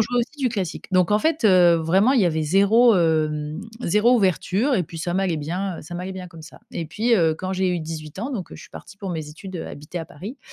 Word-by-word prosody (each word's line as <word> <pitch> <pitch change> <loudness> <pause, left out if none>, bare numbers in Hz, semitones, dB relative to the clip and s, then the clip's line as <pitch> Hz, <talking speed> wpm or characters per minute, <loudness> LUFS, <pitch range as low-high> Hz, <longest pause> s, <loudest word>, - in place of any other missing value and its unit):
jouait 240 +3 0
aussi 275 +6 -6
du 265 -3 +1
classique. 195 -8 -4
Donc 185 0 +3
en 210 - +4
fait, 315 0 0
heu, 180 -4 +6
vraiment 185 +10 +3
il 245 - +3
y - - +4
avait 160 -2 +1
0, 200 +7 +4
hem, 155 -1 0 0.2
0 210 +7 +3
ouverture 205 - +1
et 190 - +2
puis 165 - -11
ça 175 +2 -3
m'allait 185 -3 0
bien 175 +5 -3
heu - - -9
ça 165 +3 -9
m'allait 180 +2 -5
bien 185 -1 -7
comme 165 -2 -13
ça. 155 - -13
Et 165 - -4
puis, 230 +8 +1
heu, 165 -6 +3
quand 185 +3 -4
j'ai 190 0 0
eu 180 -1 0
18 155 0 -7
ans, 245 +7 -3
donc, 205 -9 -5
heu, - - -9
je - - -12
suis - - -15
partie 200 - -12
pour 195 -2 -6
mes 160 -3 -4
études, 185 +4 -9
heu, - - -5
habiter 150 +5 -7
à 165 - -6
Paris 205 - -9
185 Hz, 270 wpm, -23 LUFS, 165-210 Hz, 0.2 s, heu